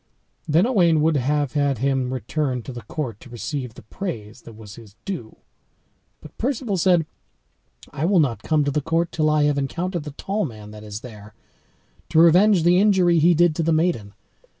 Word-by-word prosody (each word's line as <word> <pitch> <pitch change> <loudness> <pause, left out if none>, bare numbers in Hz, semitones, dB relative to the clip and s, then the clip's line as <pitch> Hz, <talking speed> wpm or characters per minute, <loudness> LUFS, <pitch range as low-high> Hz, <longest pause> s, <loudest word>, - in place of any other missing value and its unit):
Then 160 +6 +3
Owain 175 -10 +3
would 160 0 +2
have 145 +1 0
had 145 -3 +1
him 135 0 -1
return 130 +1 -2
to 130 - -8
the 120 - -8
court 115 0 -5
to 130 - -14
receive 125 0 -5
the - - -13
praise 110 - -7
that 115 - -13
was 105 -2 -12
his 105 -3 -14
due; 170 - -6 0.9
but 155 - -14
Perceval 240 -5 -1
said, 175 -2 +3 0.9
"I 150 +2 -2
will 190 0 +3
not 120 -9 0
come 155 +3 +1
to 145 - -1
the 150 - -1
court 165 +3 -1
till 155 -1 +1
I 150 -1 +2
have 145 -1 +1
encountered 175 +6 -3
the 150 - -7
tall 195 +8 -3
man 110 -7 -8
that 105 0 -11
is 105 0 -7
there, 110 -4 -12 0.7
to - - -1
revenge 175 +3 +5
the 175 +2 +4
injury 185 -5 +3
he 170 +2 +4
did 170 -1 +3
to - - +1
the 165 +1 +1
maiden. 155 - 0
150 Hz, 195 wpm, -22 LUFS, 120-170 Hz, 0.9 s, revenge